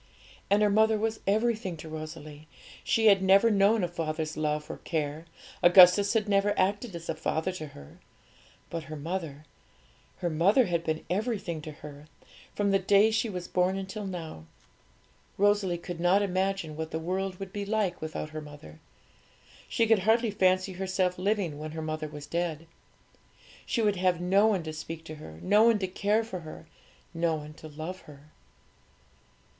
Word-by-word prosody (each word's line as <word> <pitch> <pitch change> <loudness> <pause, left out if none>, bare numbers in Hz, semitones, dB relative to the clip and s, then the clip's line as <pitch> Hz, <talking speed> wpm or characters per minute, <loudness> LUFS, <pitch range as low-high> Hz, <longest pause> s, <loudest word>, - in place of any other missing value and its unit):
And 205 +1 +4
her 210 - +4
mother 220 +1 +4
was 220 +1 -2
everything 215 -4 0
to 160 - -9
Rosalie. 155 -1 -8 0.4
She 225 - +1
had 200 -3 +6
never 195 +4 +5
known 205 +1 +3
a - - +1
father's 160 -2 -3
love 150 -1 -1
or - - -7
care; 155 -1 -3 0.4
Augustus 180 +3 +7
had 215 -1 +1
never 200 0 +2
acted 200 +2 0
as 170 0 -8
a - - -1
father 160 +3 -2
to 155 -4 -7
her. 70 - -14 0.7
But 165 -2 -4
her 155 - -7
mother 155 -1 -5 0.7
her 175 -2 -2
mother 195 +11 +4
had 170 -3 -1
been 160 -1 -3
everything 195 -5 -2
to 155 - -7
her, 145 0 -11 0.5
from 205 -1 +1
the 195 - +3
day 200 +3 +4
she 220 +1 0
was 180 -3 -5
born 180 +1 +1
until 195 +2 -5
now. 165 - -7 0.9
Rosalie 205 -3 +2
could 170 0 -7
not 180 +4 +3
imagine 190 -4 -1
what 160 0 -4
the 160 - -3
world 185 +3 -3
would 195 0 -7
be 205 -2 -3
like 200 -3 -1
without 155 -1 -5
her 155 0 -6
mother. 145 - -12 0.9
She 230 - +2
could 225 -2 +4
hardly 225 +3 +2
fancy 185 -1 +2
herself 185 -1 -1
living 185 -6 -1
when 155 0 -6
her 160 - -5
mother 155 0 -3
was 150 -1 -9
dead. 165 -1 -3 1.0
She 230 - 0
would 205 -2 +2
have 180 -1 +1
no 195 +4 +3
one 195 -6 +1
to 155 -1 -6
speak 160 +1 -7
to 155 -1 -8
her, 80 - -11
no 205 +3 +4
one 230 -1 +5
to 190 -2 -2
care 205 +4 +1
for 220 -5 -6
her, 160 0 -10 0.5
no 165 -1 0
one 150 0 -8
to 155 - -11
love 160 +5 -7
her. 145 +1 -15
180 Hz, 175 wpm, -28 LUFS, 155-200 Hz, 1.0 s, Augustus